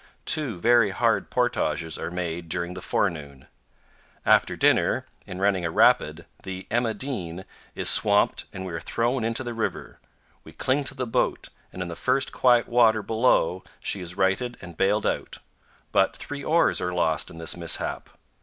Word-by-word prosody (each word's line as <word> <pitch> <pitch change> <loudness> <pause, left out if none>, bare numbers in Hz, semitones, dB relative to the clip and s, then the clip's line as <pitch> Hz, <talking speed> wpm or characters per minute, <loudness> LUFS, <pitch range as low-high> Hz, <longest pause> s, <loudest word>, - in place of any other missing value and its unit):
Two 145 - 0
very 115 0 +4
hard 95 - 0
portages 80 -2 -1
are - - -4
made 85 -1 -4
during 85 +1 -2
the 90 - -8
forenoon. 75 -10 -2 0.8
After - - +4
dinner, - - +2 0.2
in 90 - -7
running 95 -1 +1
a 85 - -1
rapid, - - +3 0.2
the 95 0 -7
"Emma 115 -1 0
Dean" 95 -10 -3 0.3
is - - +1
swamped - - +4
and 95 - -7
we 90 - -6
are 80 - -3
thrown 120 +6 -1
into 115 +3 -1
the 120 -1 -5
river; 115 -1 -4 0.4
we - - -14
cling 140 +2 0
to 135 - -3
the 130 -2 -3
boat, 115 - -1 0.2
and 90 - -5
in - - -6
the 85 - -6
first 135 +9 0
quiet 120 -2 +3
water 115 -3 +3
below 110 -6 +1 0.2
she 100 - -3
is 90 +1 -7
righted 100 +6 0
and 85 -2 -11
bailed 100 +5 +1
out; - - -2 0.5
but - - +2
three 145 -1 -7
oars 165 +3 +2
are 90 - -1
lost 80 -4 0
in 80 - -11
this 80 -1 -1
mishap. 85 -1 -2
95 Hz, 175 wpm, -25 LUFS, 85-120 Hz, 0.8 s, very